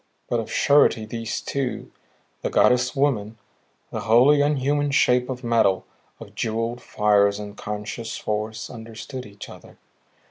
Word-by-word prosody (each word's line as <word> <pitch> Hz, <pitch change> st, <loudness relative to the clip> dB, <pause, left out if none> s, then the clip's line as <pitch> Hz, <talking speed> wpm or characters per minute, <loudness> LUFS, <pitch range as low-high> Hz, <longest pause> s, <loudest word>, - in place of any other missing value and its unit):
But 120 Hz, -, 0 dB
of 115 Hz, -, -4 dB
a -, -, -15 dB
surety 140 Hz, -6 st, +3 dB
these 115 Hz, 0 st, -4 dB
two 135 Hz, -3 st, -3 dB, 0.5 s
the -, -, -2 dB
goddess 125 Hz, +2 st, +3 dB
woman, 115 Hz, -6 st, 0 dB, 0.5 s
the -, -, -3 dB
wholly 125 Hz, +6 st, +5 dB
unhuman 145 Hz, 0 st, +1 dB
shape 125 Hz, -2 st, +3 dB
of 130 Hz, 0 st, -5 dB
metal, 110 Hz, -5 st, +2 dB, 0.3 s
of -, -, -11 dB
jeweled 115 Hz, +2 st, -2 dB
fires 100 Hz, -1 st, +2 dB
and 105 Hz, 0 st, -8 dB
conscious 105 Hz, +2 st, -5 dB
force 110 Hz, 0 st, -3 dB
understood 115 Hz, +2 st, -8 dB
each 100 Hz, -1 st, -11 dB
other. -, -, -14 dB
115 Hz, 140 wpm, -23 LUFS, 105-130 Hz, 0.5 s, wholly